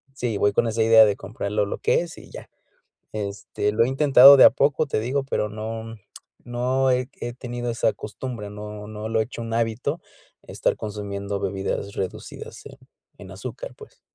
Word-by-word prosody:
sí, 120 -6 -2
voy 100 0 +2
con 120 - +2
esa 110 0 +1
idea 110 0 +7
de 105 -1 +1
comprar 100 -1 -6
lo 105 -1 +1
lo 100 - -5
que - - +2
es 170 -2 -8
y - - -13
ya. - - -10 0.6
Este, 105 0 -3
lo 115 +2 +3
he - - -1
intentado 135 0 +8
de 130 - +8
a - - +10
poco, 145 +2 +1
te 135 - -1
digo, 135 +5 -1
pero 120 -5 -1
no, 110 +1 -6 0.5
no 125 +2 0
he 125 0 +1
he 120 - -4
tenido 120 -1 -5
esa 115 - +1
costumbre, 110 -1 -7
no 105 0 -8
no 110 0 -6
lo 110 0 +1
he - - +2
hecho 120 +1 -8
un 115 0 -4
hábito, 115 +7 -1 0.4
estar - - -1
consumiendo 100 -1 -5
bebidas 100 +1 -3
reducidas 95 - -6
en, - - -11 0.4
en - - -11
azúcar, - - -8
pues. - - -15
115 Hz, 190 wpm, -24 LUFS, 105-125 Hz, 0.6 s, a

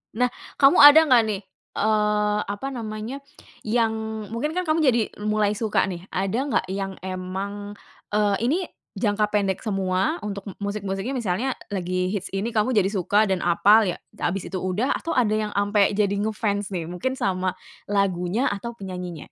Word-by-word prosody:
Nah, 250 +1 +2 0.3
kamu 275 0 +6
ada 300 +2 +10
nggak 250 -5 +6
nih, 200 -1 -2 0.4
eee, 210 0 +2
apa 205 +7 -4
namanya, 225 +3 -5 0.4
yang 225 0 +1 0.4
mungkin 300 +9 -2
kan 365 - 0
kamu 310 +1 +1
jadi 245 -5 +4 0.2
mulai 210 -1 +1
suka 215 0 +1
nih, 180 -1 -6
ada 195 +5 -1
nggak 190 - +1
yang 195 -1 -4
emang, 195 +2 -5 0.3
eee, 205 -1 +2
ini 270 +9 +2 0.4
jangka 210 -1 +1
pendek 195 -3 0
semua 195 - 0
untuk 200 -1 -5 0.2
musik-musiknya, 200 +3 -3
misalnya 235 +2 -1 0.2
lagi 185 -1 -1
hits 195 -2 -4
ini 200 +4 -1
kamu 225 +3 +1
jadi 195 -3 +3
suka 205 +1 +2
dan 190 -2 +1
apal 205 +5 +5
ya, 180 - -3 0.2
habis 185 +2 -2
itu 190 - -3
udah, 185 +8 0
atau 330 - -4
ada 235 -4 +2
yang 210 -1 -2
sampai 205 0 +2
jadi 200 -1 +1
nge-fans 205 -2 -1
nih, 170 -2 -3
mungkin 180 +9 -2
sama 185 -6 -1 0.3
lagunya 200 +3 0
atau 220 +4 -5
penyanyinya? 180 -6 -7
205 Hz, 160 wpm, -24 LUFS, 190-225 Hz, 0.4 s, ada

